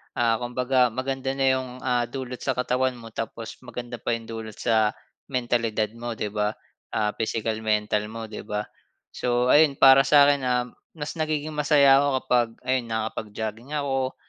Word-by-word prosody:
Ah, 115 -1 +2
kumbaga 125 +1 +2
maganda 135 +2 -3
na 135 0 +1
'yong, 130 -1 -1
ah, 125 -2 +1
dulot 130 0 -6
sa 130 -3 -1
katawan 125 0 0
mo 115 -2 -11
tapos 115 0 -6
maganda 120 -2 -7
pa 120 - -1
yung 115 - -7
dulot 110 -2 -7
sa 110 -2 +1 0.3
mentalidad 115 -4 0
mo 115 0 -6
'di 105 -1 -3
ba? 105 0 -1 0.4
Ah, 105 -1 +1
physical, 110 0 -1
mental 105 -1 0
mo 115 +1 -7
'di 110 -1 -8
ba? 105 -1 -2 0.5
So, 125 +1 +1
ayun 150 -2 +5
para 135 +1 +7
sa'kin, 145 0 +6
um, 125 -1 +1 0.3
mas 150 -2 -4
nagiging 155 -1 -1
masaya 145 -2 +5
ako 145 - +2 0.2
kapag 120 -1 +2 0.2
ayun 130 -2 0
nakapag-jogging 110 +3 -4
ako, 135 -2 -1
125 Hz, 165 wpm, -25 LUFS, 110-135 Hz, 0.5 s, para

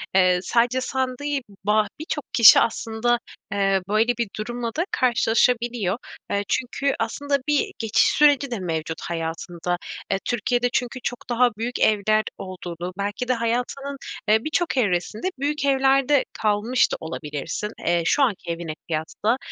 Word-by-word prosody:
eee, 185 -1 +5
sadece 245 +5 +2
san 260 0 -1
değil 290 -1 -1 0.2
ba 210 0 +3
birçok 305 -2 -4
kişi 230 -3 +9
aslında, 230 +1 0 0.3
eee, 195 -1 +2
böyle, 215 +2 +3
bir 235 -4 -1
durumla 235 +2 -3
da 335 - +2
karşılaşabiliyor. 235 -4 +2 0.3
Eee, 200 0 +1
çünkü 270 +2 0
aslında 280 +5 0
bir 295 -1 +1
geçiş 225 -2 +3
süreci 285 -2 +4
de 230 - -2
mevcut 160 -2 -3
hayatında. 170 +1 -3 0.3
Eee, 195 - +1
Türkiye'de 245 +1 0
çünkü 250 +1 -1
çok 245 0 -5
daha 245 +1 +4
büyük 240 +2 -3
evler 215 0 +3
olduğunu, 180 -1 -6
belki 205 +5 -3
de 255 - +3
hayatının, 250 +4 -2 0.3
eee, 220 +1 +4
birçok 315 -2 -1
evresinde 210 - 0
büyük 285 0 -1
evlerde 270 0 +3
kalmış 215 +4 +1
da - - 0
olabilirsin, 160 +5 -5 0.2
eee, 175 0 +3
şu 285 - +3
anki 195 -8 -1
evine 165 -2 -4
kıyasla, 170 +9 -1
230 Hz, 145 wpm, -23 LUFS, 195-255 Hz, 0.3 s, kişi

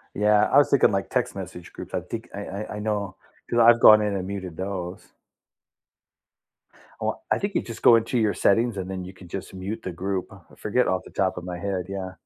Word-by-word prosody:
Yeah. 105 0 +4
I 140 - +5
was 145 - +6
thinking, 140 - +4
like, 95 -1 -1
text - - -1
message - - -8
groups. - - -9
I - - -1
think - - -7
I - - -5
I 100 +2 -6
I - - -5
know 105 -2 -2 0.3
'cause 120 - +1
I've 115 0 +7
gone 110 -2 +8
in 105 -1 -1
and 95 -1 -3
muted 95 -4 -6
those. 95 -2 -5 1.9
W - - 0 0.2
I - - +4
think 200 0 -3
you - - +2
just 115 -1 -9
go 120 - +8
into 115 +2 +1
your 110 -3 +2
settings, 115 +1 +2
and 95 -1 -4
then 95 -1 -5
you 95 - -9
can 90 -1 -14
just 95 +2 -7
mute 100 +4 -5
the 95 - -4
group. 95 +2 -3
I 95 - -13 0.2
forget 115 +4 +1
off 95 - 0
the - - -13
top 95 -2 0
of 90 - -5
my 90 0 -5
head. 95 -1 -3
Yeah. 95 -1 -5
100 Hz, 230 wpm, -25 LUFS, 95-110 Hz, 1.9 s, gone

